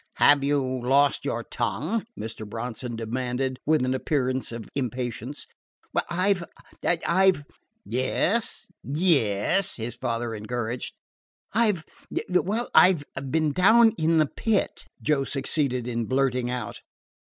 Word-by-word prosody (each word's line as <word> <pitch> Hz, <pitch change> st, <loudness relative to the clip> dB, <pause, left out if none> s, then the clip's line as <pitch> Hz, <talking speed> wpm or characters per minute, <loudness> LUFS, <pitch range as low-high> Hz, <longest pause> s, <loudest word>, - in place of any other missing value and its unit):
"Have 145 Hz, -1 st, +5 dB
you 140 Hz, 0 st, +2 dB, 0.2 s
lost 140 Hz, +3 st, +3 dB
your 115 Hz, -, -2 dB
tongue?" 150 Hz, -, -2 dB
Mr. 110 Hz, -1 st, -6 dB
Bronson 120 Hz, +2 st, -5 dB
demanded 125 Hz, +3 st, -2 dB
with 155 Hz, -4 st, +3 dB
an 130 Hz, -, 0 dB
appearance 130 Hz, -2 st, -1 dB
of 115 Hz, -1 st, -7 dB
impatience. 125 Hz, 0 st, -4 dB, 0.6 s
"I 185 Hz, +4 st, +2 dB
've 180 Hz, -3 st, -6 dB, 0.4 s
I 175 Hz, +2 st, +3 dB
've 145 Hz, -6 st, -8 dB, 0.3 s
" 220 Hz, -, -49 dB
"Yes, 170 Hz, -, 0 dB, 0.2 s
yes," 150 Hz, -, +2 dB
his 115 Hz, 0 st, -5 dB
father 115 Hz, -1 st, -2 dB
encouraged. 115 Hz, +2 st, -4 dB, 0.6 s
"I 220 Hz, 0 st, +4 dB
've 165 Hz, -4 st, -8 dB, 0.5 s
well, 200 Hz, +6 st, 0 dB
I 185 Hz, -, +8 dB, 0.2 s
've 140 Hz, -1 st, -5 dB
been 155 Hz, -1 st, +2 dB
down 225 Hz, +8 st, +6 dB
in 165 Hz, -3 st, +1 dB
the 155 Hz, -, +5 dB
Pit," 210 Hz, +7 st, -1 dB, 0.2 s
Joe 150 Hz, -3 st, +2 dB
succeeded 135 Hz, -2 st, -1 dB
in 120 Hz, -1 st, -2 dB
blurting 130 Hz, -1 st, +1 dB
out. 125 Hz, 0 st, -4 dB
135 Hz, 130 wpm, -26 LUFS, 120-170 Hz, 0.6 s, I